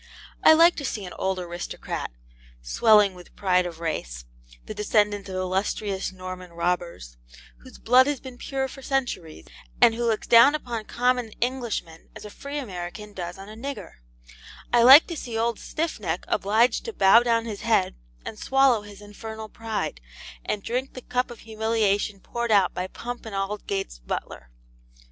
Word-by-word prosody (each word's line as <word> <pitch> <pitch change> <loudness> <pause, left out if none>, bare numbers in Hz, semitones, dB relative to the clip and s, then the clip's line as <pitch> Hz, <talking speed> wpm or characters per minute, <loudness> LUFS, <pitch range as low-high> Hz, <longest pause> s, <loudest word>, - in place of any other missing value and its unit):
I - - +9
like 335 +2 +6
to 285 - -4
see 215 -7 -3
an 180 - -8
old 190 0 0
aristocrat, 175 -1 -5 0.5
swelling 210 - +4
with 180 -1 -15
pride 180 -2 +2
of 165 -2 -9
race, - - -4 0.4
the - - -6
descendant 205 -1 0
of 190 - -5
illustrious 190 +1 -2
Norman 185 -1 -8
robbers, 170 - -3 0.4
whose - - -14
blood 255 +3 +5
has 290 -3 -1
been 255 -2 -11
pure 270 -1 -2
for 270 - -11
centuries, 240 - -3 0.3
and 230 - +6
who 235 +1 -3
looks 225 -2 0
down 240 +6 +7
upon 235 -7 -5
common 245 -1 0
Englishmen 235 -10 -3
as - - -10
a 210 - -9
free 280 +6 -7
American 205 -3 -6
does 175 -2 -6
on 195 +1 -10
a 215 - -10
nigger, 275 - -7 0.8
I 240 - +6
like 265 +6 +10
to 340 - -6
see 235 -6 -5
old 230 0 0
Stiffneck 210 - -3
obliged 220 +4 +2
to 455 - -5
bow 195 - +6
down 230 -1 +1
his 215 -3 -6
head 220 -5 +2 0.3
and 215 - -7
swallow 270 -4 +3
his 205 -1 -13
infernal 220 +1 -8
pride, 220 - -4 0.4
and 205 - -3
drink 255 +3 -3
the 255 - -7
cup 250 +1 -1
of 240 - -11
humiliation 220 -2 0
poured 235 0 -4
out 195 -4 +4
by 180 +1 -3
Pump 240 +4 -7
and 210 - -6
Aldgate's 195 - -3
butler. - - -6
215 Hz, 165 wpm, -25 LUFS, 185-240 Hz, 0.8 s, like